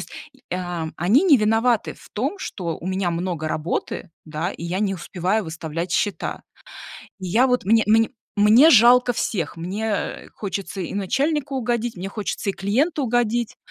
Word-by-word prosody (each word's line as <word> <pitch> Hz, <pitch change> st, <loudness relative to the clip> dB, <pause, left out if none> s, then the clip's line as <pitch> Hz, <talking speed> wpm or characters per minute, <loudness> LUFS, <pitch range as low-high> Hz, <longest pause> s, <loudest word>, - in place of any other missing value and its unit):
есть, -, -, -9 dB, 0.4 s
э, 180 Hz, -, -1 dB
а 175 Hz, -3 st, -4 dB
они 205 Hz, -, +3 dB
не 320 Hz, -8 st, +6 dB
виноваты 225 Hz, +1 st, +1 dB
в -, -, -17 dB
том, 275 Hz, -, -2 dB
что 170 Hz, -, -4 dB
у 175 Hz, -, -8 dB
меня 185 Hz, -1 st, 0 dB
много 170 Hz, -2 st, -3 dB
работы, 160 Hz, +3 st, -3 dB
да, 160 Hz, +3 st, -3 dB
и 170 Hz, -, -8 dB
я 180 Hz, +4 st, -2 dB
не 195 Hz, -2 st, 0 dB
успеваю 190 Hz, +4 st, -1 dB
выставлять 165 Hz, +1 st, -5 dB
счета". 205 Hz, +1 st, -1 dB, 0.8 s
И 185 Hz, -, -6 dB
я 240 Hz, +9 st, +3 dB
вот, 250 Hz, -6 st, +1 dB
мне 220 Hz, +2 st, +4 dB
мне 225 Hz, +1 st, +4 dB, 0.3 s
мне 220 Hz, +9 st, +7 dB
жалко 245 Hz, -1 st, +6 dB
всех, 175 Hz, -8 st, -2 dB
мне, 190 Hz, +6 st, -4 dB
э, 210 Hz, -2 st, -3 dB
хочется 195 Hz, -1 st, -5 dB
и 175 Hz, -, -5 dB
начальнику 275 Hz, -, -1 dB
угодить, 240 Hz, -3 st, -1 dB
мне 185 Hz, +2 st, -4 dB
хочется 205 Hz, -1 st, -3 dB
и -, -, -15 dB
клиенту 275 Hz, -, 0 dB
угодить. 240 Hz, -1 st, 0 dB
205 Hz, 170 wpm, -22 LUFS, 180-240 Hz, 0.8 s, мне